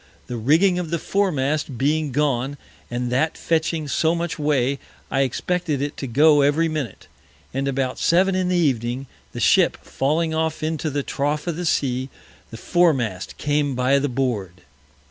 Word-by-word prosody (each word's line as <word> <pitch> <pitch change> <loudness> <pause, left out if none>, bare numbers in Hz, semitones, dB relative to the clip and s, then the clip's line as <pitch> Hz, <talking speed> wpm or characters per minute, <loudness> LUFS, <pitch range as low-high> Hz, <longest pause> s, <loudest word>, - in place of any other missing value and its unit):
The 125 - -5
Rigging 165 - +3
of 175 -3 -4
the 170 - 0
Foremast 150 -8 -1
being 150 +2 +1
gone, 140 0 0 0.3
and 120 0 -3
that 155 +5 +1
fetching 160 -1 -1
so 160 +4 +1
much 170 -1 -3
way, 140 -2 +1 0.3
I 135 - +2
expected 155 +3 -1
it 145 +1 -3
to 135 - -4
go 145 +4 +5
every 145 +4 +3
Minute; 155 -6 -4 0.5
and 135 +1 -1
about 135 -1 -1
Seven 185 +3 +3
in 185 -1 0
the 180 - +1
Evening, 130 -5 0 0.3
the - - -6
Ship - - +4
falling 160 +4 0
off 160 0 -1
into 155 0 -1
the 145 -1 -2
Trough 145 +3 -2
of 170 -3 -2
the 175 +1 -3
Sea, 130 -4 0 0.4
the 115 - -9
Foremast 125 - +1
came 145 -2 0
by 130 +2 +3
the 145 +1 -1
Board. 110 -9 -2
145 Hz, 165 wpm, -22 LUFS, 130-160 Hz, 0.5 s, go